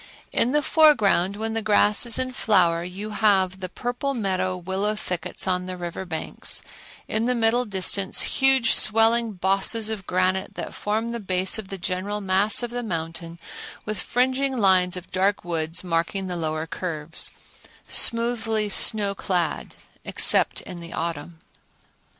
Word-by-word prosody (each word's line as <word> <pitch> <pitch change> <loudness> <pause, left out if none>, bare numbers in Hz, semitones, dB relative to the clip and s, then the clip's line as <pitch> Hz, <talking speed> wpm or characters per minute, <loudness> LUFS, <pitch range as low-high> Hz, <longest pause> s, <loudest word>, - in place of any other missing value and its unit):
In 240 - +1
the 295 +1 +1
foreground, 210 - +3
when 220 +1 -3
the 225 - -1
grass 210 +1 +3
is 230 - +2
in 255 0 -1
flower, 175 -8 +2
you 195 +4 -6
have 195 -3 +2
the 185 -1 -5
purple 245 +7 -3
meadow 185 -4 -1
willow 190 +4 -2
thickets 180 -2 -3
on 180 0 -1
the 185 0 -5
river 175 +1 -6
banks; 160 -3 -3 0.4
in 220 +1 -1
the 250 +1 +1
middle 235 +2 +2
distance 190 -1 0
huge 265 -3 +3
swelling 225 +1 +4
bosses 195 +4 +1
of 200 -4 -5
granite 185 +1 0
that - - -6
form 220 +3 -2
the 235 0 -4
base 185 0 0
of 210 - -7
the 195 - -6
general 190 +3 -3
mass 200 +4 +3
of 240 - -3
the 245 0 -3
mountain, 165 -4 -5 0.5
with 215 0 -4
fringing 260 +2 0
lines 185 -4 +3
of 180 - -9
dark 190 0 0
woods 165 -1 -2
marking 175 +2 -1
the 180 -1 -4
lower 155 -1 -3
curves, 165 -2 -4 0.6
smoothly 230 -2 +2
snow 205 0 +3
clad 180 -4 -3 0.3
except - - +2
in 180 -2 -9
the 170 0 -9
autumn. 165 0 -4
195 Hz, 155 wpm, -24 LUFS, 180-225 Hz, 0.6 s, swelling